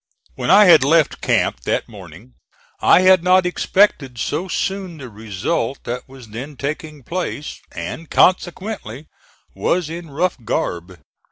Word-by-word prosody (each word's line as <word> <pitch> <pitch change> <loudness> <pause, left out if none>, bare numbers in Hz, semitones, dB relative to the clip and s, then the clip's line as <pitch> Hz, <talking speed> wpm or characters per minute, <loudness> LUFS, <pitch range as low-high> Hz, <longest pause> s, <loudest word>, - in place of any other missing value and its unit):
When - - -4
I 205 +2 +8
had 175 -8 +7
left 155 +2 +2
camp - - +1
that - - -2
morning 65 - -13 0.5
I 180 - +6
had 185 -1 +5
not 185 0 +4
expected 180 -8 +1
so 150 +10 -2
soon 190 -2 -3
the 130 -5 -9
result 110 - -3
that 125 +2 -6
was 130 -4 -13
then 130 +7 -8
taking 150 0 -5
place, 170 -1 -5
and 165 -1 -7
consequently 180 - 0 0.5
was 170 -3 -1
in 170 -1 -7
rough 170 +6 -1
garb. 90 -3 -3
155 Hz, 140 wpm, -19 LUFS, 125-180 Hz, 0.5 s, I